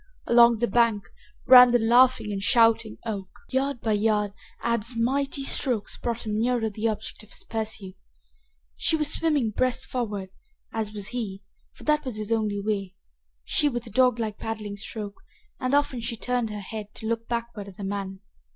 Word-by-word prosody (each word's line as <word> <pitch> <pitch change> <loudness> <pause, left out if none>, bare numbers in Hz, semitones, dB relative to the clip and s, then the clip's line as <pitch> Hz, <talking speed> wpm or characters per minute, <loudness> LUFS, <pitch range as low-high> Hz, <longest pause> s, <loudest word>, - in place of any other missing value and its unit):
Along 235 -1 +6
the 240 +2 0
bank 230 -4 +2 0.4
ran 250 -1 +10
the 245 - +5
laughing 240 -1 +4
and 195 -1 -3
shouting 225 0 +3
Oak. 200 -4 -4 0.2
Yard 270 -1 -1
by 220 - 0
yard, 210 -1 +1 0.3
Ab's 235 0 -1
mighty 275 +4 0
strokes 250 -5 +1
brought 235 -1 -4
him 215 0 -1
nearer 235 -2 +1
the 215 +2 -2
object 215 -2 -4
of 215 - -14
his - - -8
pursuit. 215 -4 -4 0.8
She 325 - +2
was 300 -1 +1
swimming 295 -9 +1
breast 255 +3 0
forward, 205 -6 -4 0.4
as 220 -2 -2
was 205 -2 -3
he 210 -6 -5 0.3
for - - -15
that 300 0 +2
was 255 -6 -4
his 215 +1 -4
only 215 -3 0
way 200 -2 -3 0.5
she 295 - +2
with 240 -3 -4
a 230 - -10
dog 250 -2 +3
like 215 -2 -3
paddling 215 -2 -5
stroke, 205 0 -7 0.4
and 255 +2 +1
often 280 -4 +1
she 230 0 -3
turned 245 -1 -1
her 210 -1 -5
head 210 +1 -6
to 220 - -8
look 230 0 -2
backward 235 -3 -4
at 195 - -12
the 205 - -7
man. 195 -1 -4
225 Hz, 180 wpm, -26 LUFS, 210-245 Hz, 0.8 s, ran